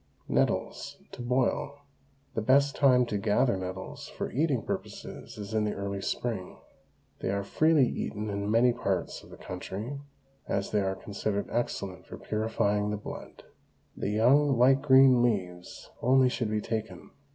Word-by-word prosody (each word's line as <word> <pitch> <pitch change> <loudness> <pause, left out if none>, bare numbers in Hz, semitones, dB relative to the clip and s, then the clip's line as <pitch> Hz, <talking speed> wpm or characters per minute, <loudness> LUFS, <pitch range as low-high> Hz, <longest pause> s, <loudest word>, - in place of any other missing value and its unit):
NETTLES, - - -1
TO - - -8
BOIL. 125 +3 0 0.6
The 115 - -1
best 140 +5 +3
time 125 -3 +5
to 105 -3 -2
gather 110 +3 +2
nettles 95 0 -6
for - - -5
eating 140 -4 +1
purposes - - -6
is 105 0 -7
in 110 -1 +2
the 105 - -1
early 100 0 -4
spring. 105 -4 -3 0.6
They - - -2
are 100 +1 -1
freely 155 +4 +3
eaten 105 -1 -4
in 100 0 -2
many 120 +3 +4
parts - - -2
of - - -16
the - - -12
country, 105 +9 -6 0.5
as 100 - -1
they 105 - +2
are 95 0 -1
considered 100 +1 -3
excellent 100 -6 -3
for - - -8
purifying 105 -1 0
the 105 - -2
blood. 105 - -9 0.5
The - - -3
young 130 +6 +4
light 135 +3 +5
green 130 -3 +6
leaves 90 -7 -2
only 130 +1 +5
should 120 -3 -2
be 105 0 0
taken. 110 0 -5
110 Hz, 155 wpm, -29 LUFS, 100-130 Hz, 0.6 s, green